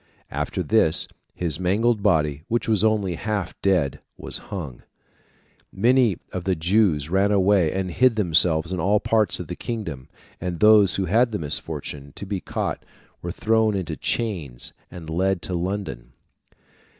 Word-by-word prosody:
After -, -, -2 dB
this, -, -, +2 dB, 0.3 s
his 80 Hz, -4 st, 0 dB
mangled 105 Hz, +5 st, +1 dB
body, 75 Hz, -8 st, +2 dB
which 120 Hz, +1 st, -1 dB
was 110 Hz, -2 st, +2 dB
only 105 Hz, -4 st, +2 dB
half 100 Hz, 0 st, -3 dB
dead, 90 Hz, -9 st, +1 dB, 0.2 s
was -, -, -2 dB
hung 75 Hz, -11 st, -5 dB
(Fig. -, -, -22 dB, 1.0 s
359). -, -, -6 dB
Many 120 Hz, -6 st, +4 dB
of 90 Hz, -, -4 dB
the 95 Hz, -1 st, +1 dB
Jews 85 Hz, -3 st, +2 dB
ran 100 Hz, +2 st, +3 dB
away 95 Hz, -4 st, +3 dB
and 95 Hz, -1 st, -2 dB
hid 125 Hz, +5 st, +3 dB
themselves 85 Hz, -4 st, +3 dB
in 90 Hz, -, -2 dB
all 100 Hz, +5 st, +3 dB
parts 110 Hz, -3 st, +1 dB
of -, -, -5 dB
the -, -, -6 dB
kingdom, 100 Hz, -, -5 dB, 0.3 s
and 90 Hz, -1 st, -4 dB
those 105 Hz, -3 st, +6 dB
who 95 Hz, -, 0 dB
had 115 Hz, +7 st, +3 dB
the 105 Hz, -, -1 dB
misfortune 70 Hz, -2 st, -5 dB
to -, -, -7 dB
be 100 Hz, -1 st, -3 dB
caught -, -, -3 dB, 0.4 s
were 85 Hz, -, -4 dB
thrown 110 Hz, +2 st, +1 dB
into 95 Hz, -5 st, -3 dB
chains 80 Hz, -, -3 dB, 0.2 s
and 85 Hz, -3 st, -10 dB
led 95 Hz, +4 st, 0 dB
to 95 Hz, -, -4 dB
London. 85 Hz, -9 st, -4 dB
95 Hz, 160 wpm, -23 LUFS, 80-105 Hz, 1.0 s, those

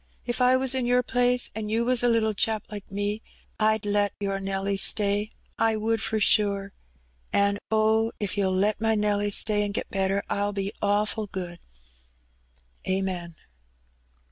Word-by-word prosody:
If 240 Hz, +1 st, -2 dB
I 250 Hz, +1 st, +5 dB
was 265 Hz, 0 st, +2 dB
in 255 Hz, -2 st, 0 dB
Your 250 Hz, 0 st, +3 dB
place, 245 Hz, 0 st, +2 dB
an' 215 Hz, -1 st, -5 dB
You 225 Hz, +2 st, +1 dB
was 250 Hz, -1 st, +4 dB
a 245 Hz, -, +3 dB
little 220 Hz, -2 st, +2 dB
chap 220 Hz, 0 st, 0 dB
like 205 Hz, -2 st, -8 dB
me, 205 Hz, +2 st, -2 dB, 0.4 s
I'd 215 Hz, -1 st, +2 dB
let 205 Hz, -1 st, +1 dB
Your 195 Hz, -1 st, -2 dB
Nelly 195 Hz, 0 st, -2 dB
stay. 205 Hz, +1 st, +2 dB, 0.3 s
I 225 Hz, -1 st, +2 dB
would 220 Hz, +1 st, 0 dB
for 220 Hz, 0 st, 0 dB
sure. 200 Hz, -1 st, +2 dB, 0.6 s
An' 200 Hz, 0 st, +2 dB
oh, 220 Hz, +1 st, +2 dB
if 200 Hz, -2 st, -2 dB
You'll 195 Hz, -2 st, +1 dB
let 200 Hz, +3 st, +1 dB
my 225 Hz, 0 st, +2 dB
Nelly 205 Hz, -1 st, +1 dB
stay 210 Hz, +1 st, +2 dB
an' 205 Hz, -1 st, -3 dB
get -, -, -4 dB
better, 195 Hz, 0 st, 0 dB
I'll 205 Hz, 0 st, -1 dB
be 200 Hz, 0 st, -3 dB
awful 210 Hz, +1 st, 0 dB
good. 180 Hz, -3 st, -6 dB, 1.3 s
Amen." 185 Hz, -3 st, -2 dB
205 Hz, 165 wpm, -26 LUFS, 200-220 Hz, 1.3 s, I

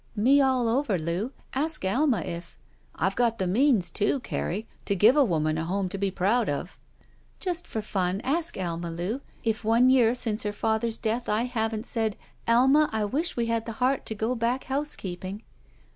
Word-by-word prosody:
Me 260 Hz, +7 st, +5 dB
all 260 Hz, -3 st, +2 dB
over, 230 Hz, -4 st, +1 dB
Loo. 170 Hz, +9 st, -2 dB, 0.2 s
Ask 305 Hz, -4 st, -2 dB
Alma 245 Hz, -, +2 dB
if 170 Hz, +1 st, -7 dB
— -, -, -36 dB
'* -, -, -32 dB
I've 190 Hz, 0 st, 0 dB
got 235 Hz, -2 st, +2 dB
the 190 Hz, -, -1 dB
means, 205 Hz, -2 st, +3 dB
too, 215 Hz, +6 st, +1 dB
Carrie, 215 Hz, -1 st, -3 dB, 0.2 s
to 200 Hz, -, +1 dB
give 215 Hz, +8 st, +6 dB
a 295 Hz, -, +6 dB
woman 155 Hz, -, 0 dB
a -, -, -1 dB
home 190 Hz, +2 st, -1 dB
to 195 Hz, -, -5 dB
be 200 Hz, 0 st, +1 dB
proud 200 Hz, +5 st, +1 dB
of." 145 Hz, +6 st, -4 dB, 0.6 s
"Just 355 Hz, -2 st, -3 dB
for 220 Hz, -, -4 dB
fun, 190 Hz, -2 st, -1 dB
ask 330 Hz, +5 st, -1 dB
Alma, 170 Hz, -2 st, -3 dB
Loo, 180 Hz, +10 st, -3 dB, 0.2 s
if 225 Hz, -1 st, -1 dB
one 230 Hz, +4 st, +4 dB
year 245 Hz, -2 st, +4 dB
since 225 Hz, -3 st, -1 dB
her 210 Hz, 0 st, -2 dB
father's 220 Hz, +2 st, 0 dB
death 235 Hz, +2 st, -2 dB
I 215 Hz, +2 st, +2 dB
haven't 225 Hz, -2 st, -2 dB
said, 220 Hz, -4 st, -1 dB, 0.3 s
*Alma, 265 Hz, +6 st, +5 dB
I 220 Hz, -1 st, 0 dB
wish 295 Hz, -, -1 dB
I 235 Hz, -, +1 dB
had 230 Hz, 0 st, -1 dB
the 230 Hz, -, -4 dB
heart 255 Hz, +4 st, 0 dB
to 220 Hz, -, -3 dB
go 220 Hz, +3 st, -1 dB
back 240 Hz, +2 st, 0 dB
housekeeping.' 205 Hz, -8 st, -4 dB
225 Hz, 195 wpm, -27 LUFS, 195-250 Hz, 0.6 s, give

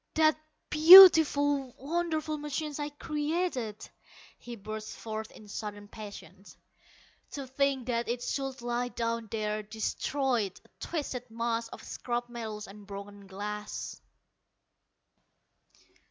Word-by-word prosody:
"That 315 Hz, -1 st, +4 dB, 0.4 s
beautiful, 305 Hz, -5 st, +8 dB
wonderful 310 Hz, 0 st, -2 dB
machine 300 Hz, +1 st, -4 dB
I 295 Hz, 0 st, -2 dB
created!" 295 Hz, -, -3 dB, 0.5 s
he 240 Hz, 0 st, -8 dB
burst 215 Hz, 0 st, -7 dB
forth 220 Hz, -1 st, -6 dB
in 215 Hz, -, -15 dB
sudden 205 Hz, 0 st, -7 dB
passion. 200 Hz, -4 st, -11 dB, 0.9 s
"To 280 Hz, -2 st, -5 dB
think 265 Hz, -1 st, 0 dB
that 235 Hz, -1 st, -2 dB
it 240 Hz, +1 st, -2 dB
should 270 Hz, -3 st, -4 dB
lie 240 Hz, +1 st, -1 dB
down 230 Hz, -1 st, -3 dB
there, 215 Hz, -1 st, -2 dB
destroyed, 220 Hz, +1 st, -2 dB
a -, -, -23 dB
twisted 255 Hz, -6 st, -4 dB
mass 230 Hz, 0 st, -2 dB
of -, -, -11 dB
scrap 240 Hz, 0 st, -4 dB
metal 220 Hz, -3 st, -6 dB
and 200 Hz, 0 st, -13 dB
broken 200 Hz, 0 st, -9 dB
glass!" 210 Hz, +2 st, -6 dB
240 Hz, 110 wpm, -29 LUFS, 215-290 Hz, 0.9 s, beautiful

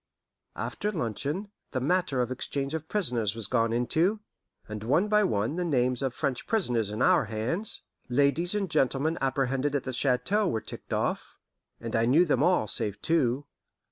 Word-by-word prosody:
After 210 Hz, -, -3 dB
luncheon, 150 Hz, -, -3 dB, 0.2 s
the 130 Hz, -, 0 dB
matter 145 Hz, -2 st, +1 dB
of 125 Hz, -, -5 dB
exchange 135 Hz, +2 st, -3 dB
of 160 Hz, -1 st, -4 dB
prisoners 120 Hz, -, +1 dB
was 115 Hz, -2 st, +2 dB
gone 115 Hz, +1 st, +2 dB
into, 160 Hz, -, +1 dB, 0.5 s
and 105 Hz, 0 st, -6 dB
one 145 Hz, -, +2 dB
by 210 Hz, 0 st, +3 dB
one 110 Hz, -, 0 dB
the 180 Hz, -, 0 dB
names 125 Hz, -6 st, +1 dB
of 135 Hz, -2 st, 0 dB
the -, -, -20 dB
French 130 Hz, -3 st, -2 dB
prisoners 125 Hz, -, +1 dB
in 105 Hz, +4 st, -1 dB
our 180 Hz, -8 st, +4 dB
hands 115 Hz, -, -1 dB, 0.3 s
ladies 145 Hz, +8 st, +2 dB
and 200 Hz, -2 st, 0 dB
gentlemen 155 Hz, +2 st, +1 dB
apprehended 135 Hz, +1 st, 0 dB
at 140 Hz, -, 0 dB
the 130 Hz, -, -4 dB
chateau 140 Hz, -, +1 dB
were 115 Hz, -, 0 dB
ticked -, -, -10 dB
off, -, -, -2 dB, 0.4 s
and 115 Hz, -1 st, -4 dB
I 115 Hz, +1 st, +2 dB
knew 155 Hz, +8 st, +5 dB
them 150 Hz, -, +1 dB
all 175 Hz, -7 st, +3 dB
save 105 Hz, 0 st, -1 dB
two. 145 Hz, -4 st, +1 dB
135 Hz, 175 wpm, -28 LUFS, 120-170 Hz, 0.5 s, knew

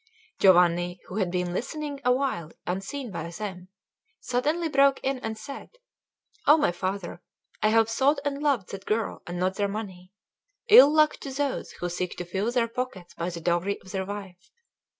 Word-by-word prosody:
Giovanni, 175 Hz, -1 st, +4 dB
who 185 Hz, -, -7 dB
had 190 Hz, -4 st, +1 dB
been 180 Hz, 0 st, -2 dB
listening 290 Hz, -, -4 dB
awhile 250 Hz, -, 0 dB
unseen 205 Hz, +8 st, -4 dB
by 170 Hz, -, -5 dB
them, 185 Hz, 0 st, -6 dB, 0.5 s
suddenly 300 Hz, +7 st, 0 dB
broke 275 Hz, -2 st, +4 dB
in 270 Hz, -1 st, -1 dB
and 220 Hz, -2 st, -4 dB
said: 275 Hz, -, -9 dB, 0.7 s
"O 300 Hz, +2 st, +8 dB
my 290 Hz, -, +2 dB
father, 180 Hz, 0 st, -4 dB, 0.4 s
I -, -, +4 dB
have 225 Hz, 0 st, +4 dB
sought 270 Hz, +6 st, +2 dB
and 285 Hz, 0 st, -2 dB
loved 275 Hz, -10 st, 0 dB
that 195 Hz, 0 st, -8 dB
girl 220 Hz, 0 st, -1 dB
and 175 Hz, +1 st, -4 dB
not 185 Hz, +1 st, 0 dB
their 205 Hz, -, +1 dB
money. 190 Hz, -3 st, -7 dB, 0.6 s
Ill 295 Hz, -, +10 dB
luck 305 Hz, 0 st, +4 dB
to 275 Hz, -, -7 dB
those 280 Hz, 0 st, -2 dB
who 175 Hz, -, -4 dB
seek 180 Hz, +1 st, -4 dB
to 175 Hz, -, -4 dB
fill 195 Hz, +6 st, -1 dB
their 240 Hz, -2 st, +1 dB
pockets 230 Hz, -7 st, -5 dB
by 170 Hz, +1 st, -3 dB
the 170 Hz, -1 st, -7 dB
dowry 175 Hz, +4 st, 0 dB
of 185 Hz, -, -12 dB
their 190 Hz, 0 st, -3 dB
wife! 195 Hz, -2 st, -8 dB
205 Hz, 175 wpm, -26 LUFS, 180-270 Hz, 0.7 s, Ill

